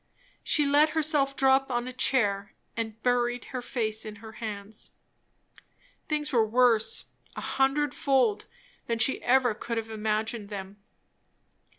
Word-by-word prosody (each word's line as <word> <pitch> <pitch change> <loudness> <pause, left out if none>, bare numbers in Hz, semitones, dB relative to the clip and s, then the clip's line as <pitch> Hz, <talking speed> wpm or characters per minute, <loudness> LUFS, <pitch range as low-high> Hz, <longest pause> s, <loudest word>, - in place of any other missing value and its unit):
She 295 - +2
let 290 +2 +4
herself 295 -3 +2
drop 270 0 +3
on 240 0 -1
a 255 - -6
chair 205 -6 +1 0.2
and 225 -1 -4
buried 245 -1 +1
her 255 - -2
face 220 -3 -2
in 215 -1 -7
her 220 +1 -11
hands. 215 -2 -5 1.1
Things 300 -1 -2
were 230 -3 +5
worse, 230 0 +2 0.3
a - - -5
hundred 275 +1 +1
fold, 255 -7 +1 0.4
than 230 - 0 0.2
ever 250 -2 +3
she - - -19
could 235 -1 -3
have 225 0 -4
imagined 215 0 -2
them. 195 -1 -7
240 Hz, 135 wpm, -28 LUFS, 215-265 Hz, 1.1 s, were